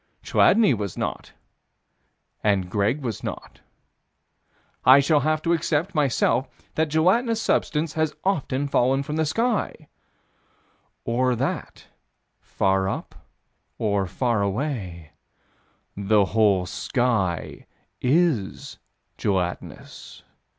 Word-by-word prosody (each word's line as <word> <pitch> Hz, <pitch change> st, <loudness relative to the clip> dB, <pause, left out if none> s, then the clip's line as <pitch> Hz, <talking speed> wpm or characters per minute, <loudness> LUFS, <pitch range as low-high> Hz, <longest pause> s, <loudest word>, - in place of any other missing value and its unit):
Chladni 210 Hz, -, +4 dB
was 100 Hz, -5 st, -4 dB
not, -, -, -4 dB, 1.1 s
and 95 Hz, -4 st, +1 dB
Greg 110 Hz, +8 st, 0 dB
was 115 Hz, -5 st, -4 dB
not. -, -, -7 dB, 1.2 s
I 130 Hz, +3 st, +8 dB
shall 145 Hz, +2 st, +3 dB
have 155 Hz, +1 st, 0 dB
to 170 Hz, -, +2 dB
accept, 165 Hz, +2 st, -1 dB
myself, 135 Hz, -4 st, +1 dB, 0.3 s
that 160 Hz, 0 st, 0 dB
gelatinous 215 Hz, +9 st, +2 dB
substance 155 Hz, -7 st, 0 dB
has 155 Hz, -1 st, -1 dB
often 145 Hz, -7 st, -1 dB
fallen 135 Hz, 0 st, +2 dB
from 150 Hz, +2 st, -4 dB
the 160 Hz, -1 st, +1 dB
sky 210 Hz, -5 st, -1 dB, 1.2 s
Or 125 Hz, +2 st, +1 dB
that, -, -, -4 dB, 0.5 s
far 95 Hz, 0 st, 0 dB
up, -, -, -5 dB, 0.6 s
or 100 Hz, -3 st, 0 dB
far 115 Hz, +4 st, 0 dB
away, 100 Hz, -, -3 dB, 0.8 s
the 100 Hz, +1 st, +2 dB
whole 105 Hz, -5 st, +3 dB
sky 110 Hz, -, -2 dB, 0.3 s
is 140 Hz, -, 0 dB, 0.4 s
gelatinous? 90 Hz, -3 st, -4 dB
130 Hz, 100 wpm, -24 LUFS, 100-155 Hz, 1.2 s, I